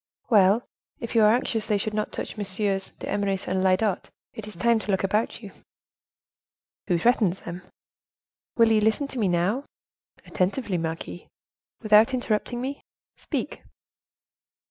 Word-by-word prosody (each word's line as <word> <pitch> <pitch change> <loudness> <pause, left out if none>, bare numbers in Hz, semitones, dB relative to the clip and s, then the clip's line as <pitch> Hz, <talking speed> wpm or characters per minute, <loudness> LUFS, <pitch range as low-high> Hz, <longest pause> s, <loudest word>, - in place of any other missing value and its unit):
"Well, 205 +2 +5 0.4
if 230 - -6
you 230 - +4
are 210 0 +6
anxious 225 -2 0
they 210 -2 +2
should 215 +2 -3
not 215 0 -2
touch - - -5
MM. 195 -1 -2
d'Eymeris 195 -2 -2
and 185 0 0
Lyodot, 190 +1 +1 0.2
it 215 -1 -8
is 210 - -9
time 230 +6 +2
to 215 - -9
look 190 -1 +1
about 210 +4 -1
you." 200 - -9 1.4
"Who 175 -4 +2
threatens 200 -2 +2
them?" 175 +1 -7 1.0
"Will 230 -1 +5
you 215 -1 +4
listen 220 +6 +2
to 260 - -5
me 210 - +2
now?" 180 +9 +1 0.6
"Attentively, 190 0 -1
marquise." 165 +1 -5 0.6
"Without 215 +4 +5
interrupting 240 0 -1
me?" 275 +2 -4 0.3
"Speak." - - -4
210 Hz, 145 wpm, -25 LUFS, 190-225 Hz, 1.4 s, are